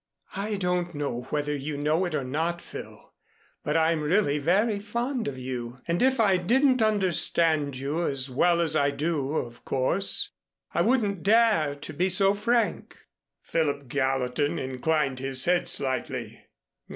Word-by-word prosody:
"I 205 +2 -2
don't 180 -3 -1
know 125 -4 -3
whether 150 0 -1
you 145 +1 -4
know 155 +5 +1
it 175 -3 -3
or 140 - -1
not, 160 +6 -2
Phil, - - -11 0.5
but - - 0
I'm 160 0 +2
really 150 -2 +1
very 200 +8 +2
fond 235 +4 -3
of 135 -2 -4
you. 125 -1 -5
And 170 +1 0
if 260 0 +3
I 200 -4 +4
didn't 255 +7 +2
understand 170 -8 +1
you 150 +6 -2
as 135 -1 0
well 170 +7 +2
as 160 -2 +1
I 145 -2 +3
do, 145 -1 -2
of 120 -6 -4
course, 165 +9 +1 0.4
I - - +2
wouldn't 210 -7 +1
dare 210 -9 +3
to 145 - -8
be 185 +2 +1
so 195 +2 +3
frank." 235 +3 -1 0.5
Philip 145 -5 -1
Gallatin 135 +1 0
inclined 135 +1 -1
his 135 -1 0
head 175 0 +2
slightly. 130 -2 -2
160 Hz, 150 wpm, -26 LUFS, 140-195 Hz, 0.5 s, I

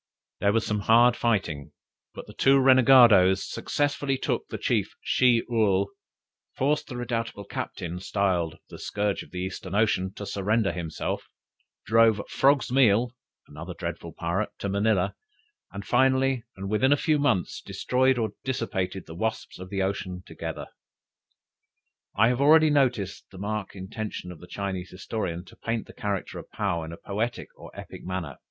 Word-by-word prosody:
There 100 - +3
was 115 +1 +1
some 105 0 -1
hard 120 +4 +5
fighting, 95 - -1 0.4
but - - -8
the - - -12
two 135 +1 +4
renegadoes 120 -8 +6
successively 145 -1 -1
took - - -2
the - - -5
chief - - -1
Shih 125 -3 +3
Url, 100 -4 +2 0.7
forced 150 +3 0
the 125 - -6
redoubtable 115 -3 -3
captain, 90 -2 -5
styled 90 -4 0
"The - - -9
scourge 105 -1 -1
of - - -12
the 90 - -5
Eastern 95 0 -5
Ocean" 100 -3 +2
to 100 - -6
surrender 100 +2 0
himself, 85 -3 -4 0.6
drove 115 -1 +4
"Frog's 140 -2 +3
Meal," 120 -2 +4 0.3
another 85 +4 -8
dreadful - - -6
pirate, 90 +6 -2
to - - -4
Manilla, 100 -1 +1 0.6
and 100 0 -7
finally, 130 0 +2
and 95 +1 -5
within 110 +7 +2
a 145 - +5
few 155 0 +1
months, 120 -11 0
destroyed 130 +1 +1
or 110 -2 -1
dissipated 95 -8 -2
the 80 - -10
"wasps 110 +4 -3
of 90 0 -8
the 95 -1 -1
ocean" 95 -1 -2
altogether. - - -6 1.5
I 110 +3 +5
have 125 +2 0
already 155 +2 +6
noticed 125 -9 0
the 95 - -13
marked 105 +1 -4
intention 95 -1 -6
of 85 - -11
the 90 - -13
Chinese 95 -3 -4
historian, 90 -2 -4
to - - -16
paint 115 -1 -3
the - - -14
character 100 -2 -3
of - - -12
Paou 95 -6 -2
in 80 - -8
a 85 - -8
poetical 110 +4 -4
or - - -11
epic - - -10
manner. 90 -7 -5
105 Hz, 160 wpm, -26 LUFS, 95-125 Hz, 1.5 s, renegadoes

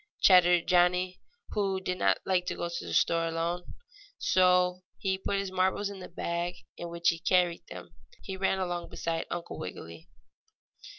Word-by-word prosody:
chattered 175 -2 +6
Johnnie, 180 +1 +2 0.3
who 195 -2 0
did 185 -1 -3
not - - +3
like 180 -1 +1
to - - -2
go 170 - -3
to 170 0 -5
the - - -5
store 165 0 +2
alone. 170 +2 -3 0.4
So, 180 0 +3 0.2
putting 195 +1 -1
his 195 -1 -5
marbles 190 +2 0
in 200 - -9
the 185 - -9
bag 170 +1 -3 0.2
in 170 - -6
which 170 0 +1
he 165 - -1
carried 175 -1 +2
them, - - -10 0.3
he 190 - -5
ran 190 0 +1
along 175 -2 -3
beside 165 -1 -3
Uncle 175 -1 -5
Wiggily. 85 -5 -8
180 Hz, 165 wpm, -29 LUFS, 170-185 Hz, 0.4 s, chattered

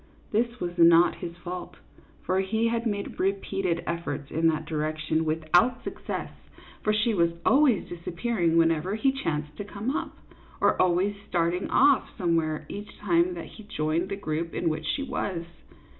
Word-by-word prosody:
This 235 +3 0
was 175 -3 -3
not 170 +1 +7
his 170 0 -7
fault, 180 +1 -7 0.5
for 185 +1 +1
he 220 +4 +1
had 235 0 -1
made 205 -2 -3
repeated 195 -3 0
efforts 145 -4 -4
in 165 +1 +2
that 155 -1 0
direction, 155 +1 -1
without 165 +10 +2
suc - - -7
cess, - - -3 0.5
for 215 - +2
she 215 +2 +2
was 170 -3 +2
always 265 -7 +4
disappearing 170 0 -1
whenever 165 +4 +2
he 265 +5 +2
chanced 150 - -3
to - - -4
come 210 +7 -3
up, - - -4 0.4
or - - +4
always 185 +3 +2
starting 175 +1 0
off 280 +1 +4
some 175 -5 +1
where 155 -1 -1
each 205 +1 -8
time 175 -2 +2
that 170 - -6
he 220 - -12
joined 165 -3 -1
the 195 - -2
group 165 -3 -3
in 170 - +1
which 155 - -3
she 280 - -1
was. 185 -10 -3
175 Hz, 170 wpm, -27 LUFS, 165-210 Hz, 0.5 s, not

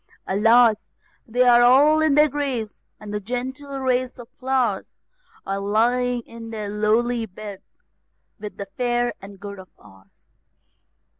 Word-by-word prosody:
Alas! 225 +2 +3 0.4
they 245 +2 +2
all 255 +6 +6
are - - +2
in 310 -3 +3
their 300 +1 +6
graves, 265 -7 -4 0.2
the 210 0 -5
gentle 260 +6 -5
race 255 -1 -1
of 240 -2 -11
flowers 255 -6 -1 0.5
Are 195 0 -2
lying 240 +4 +1
in 230 0 -11
their 215 -2 -5
lowly 225 +3 0
beds, 200 0 -12 0.6
with 210 0 -8
the 200 - -5
fair 240 +4 -1
and 195 0 -12
good 200 0 -8
of 185 - -13
ours. 95 -2 -21
235 Hz, 135 wpm, -22 LUFS, 205-250 Hz, 0.6 s, all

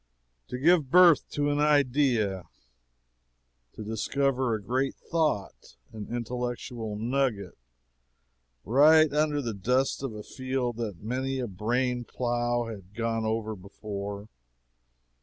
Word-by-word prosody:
To - - -5
give 155 0 +3
birth 175 0 +6
to 145 0 0
an 145 - 0
idea 130 - +2 1.3
to 110 - -8
discover 130 +3 0
a - - -4
great 130 +5 -1
thought 155 - -2 0.2
an 105 -2 -7
intellectual 120 -1 -4
nugget, 115 -4 -1 1.1
right 150 +5 +6
under 150 -1 +1
the 115 -2 -3
dust 125 +9 0
of 135 -6 -4
a 105 - -7
field 130 -2 -3
that 105 -6 -5
many 130 +4 -2
a 130 - -2
brain 120 +5 -1
plow 120 0 -1
had 105 -3 -10
gone 115 -1 -1
over 110 0 -2
before. 100 +1 -7
120 Hz, 120 wpm, -28 LUFS, 110-135 Hz, 1.3 s, birth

